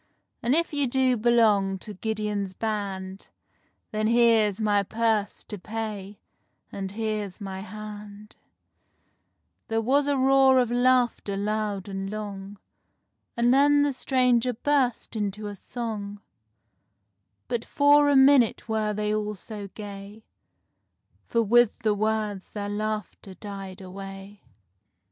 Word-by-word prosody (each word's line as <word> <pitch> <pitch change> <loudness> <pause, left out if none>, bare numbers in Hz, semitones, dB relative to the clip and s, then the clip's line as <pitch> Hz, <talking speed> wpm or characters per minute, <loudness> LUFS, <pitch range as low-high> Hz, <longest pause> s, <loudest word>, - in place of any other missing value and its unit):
And 240 +4 +2
if 335 -1 0
you 285 -2 +1
do 255 0 +2
belong 215 -4 +3
to 210 +3 -9
Gideon's 210 -2 -3
Band, 195 -3 -4 0.6
Then 215 0 0
here's 225 -3 +3
my 205 -2 +2
purse 220 0 -1
to 210 - -7
pay—and 205 -2 -8
here's 215 -3 -3
my 195 -2 -6
hand"— 210 +1 -9 1.3
There 225 0 0
was 275 +5 +2
a 285 -1 +1
roar 265 0 +5
of 245 -2 +2
laughter 245 -4 +2
loud 210 -1 -2
and 195 0 -4
long, 205 -1 -6 0.8
And 240 +1 +4
then 285 +1 +5
the 290 -1 +1
stranger 250 -2 +2
burst 250 -1 0
into 210 0 -3
a 205 0 -5
song; 205 -2 -5 1.3
But 235 -1 -2
for 290 0 +4
a 285 - +4
minute 265 -5 +5
were 215 -1 0
they 210 0 -1
all 210 0 -2
so 205 0 -8
gay, 205 +1 -10 1.0
For 230 -1 +1
with 240 +1 +4
the 215 -2 +3
words 210 -2 -2
their 205 -1 -5
laughter 210 -2 -4
died 195 -1 -8
away. 195 +1 -9
215 Hz, 120 wpm, -26 LUFS, 200-240 Hz, 1.3 s, roar